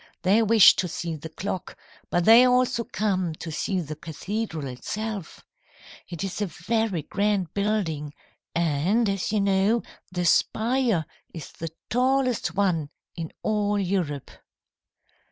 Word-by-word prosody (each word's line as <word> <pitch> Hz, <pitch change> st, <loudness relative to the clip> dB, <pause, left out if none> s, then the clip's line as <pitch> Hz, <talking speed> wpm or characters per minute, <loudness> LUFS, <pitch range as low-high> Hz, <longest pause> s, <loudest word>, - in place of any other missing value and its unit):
They 200 Hz, +5 st, +4 dB
wish 225 Hz, -2 st, +7 dB
to 180 Hz, -, 0 dB
see 165 Hz, 0 st, -4 dB
the 155 Hz, +1 st, -8 dB
clock, 185 Hz, +2 st, -5 dB, 0.3 s
but 175 Hz, 0 st, +1 dB
they 230 Hz, +3 st, +9 dB
also 250 Hz, -1 st, +3 dB
come 185 Hz, -5 st, -1 dB
to 165 Hz, +1 st, -7 dB
see 190 Hz, +4 st, -1 dB
the 155 Hz, -1 st, -6 dB
cathedral 165 Hz, +1 st, -4 dB
itself. 200 Hz, -, -5 dB, 0.6 s
It 170 Hz, -1 st, -5 dB
is 195 Hz, +2 st, -4 dB
a 205 Hz, -, +1 dB
very 190 Hz, +1 st, -1 dB
grand 200 Hz, -1 st, -1 dB
building, 180 Hz, -8 st, -1 dB, 0.4 s
and, 170 Hz, +8 st, +2 dB
as 195 Hz, 0 st, -1 dB
you 215 Hz, -2 st, +2 dB
know, 200 Hz, +4 st, +2 dB, 0.3 s
the 180 Hz, -1 st, -2 dB
spire 225 Hz, 0 st, +2 dB, 0.3 s
is 160 Hz, -4 st, -8 dB
the 165 Hz, -, -6 dB, 0.2 s
tallest 255 Hz, 0 st, +1 dB
one 175 Hz, -7 st, +1 dB, 0.3 s
in 165 Hz, -2 st, -5 dB
all 210 Hz, -1 st, +1 dB
Europe. 175 Hz, -8 st, -2 dB
195 Hz, 135 wpm, -25 LUFS, 165-220 Hz, 0.6 s, they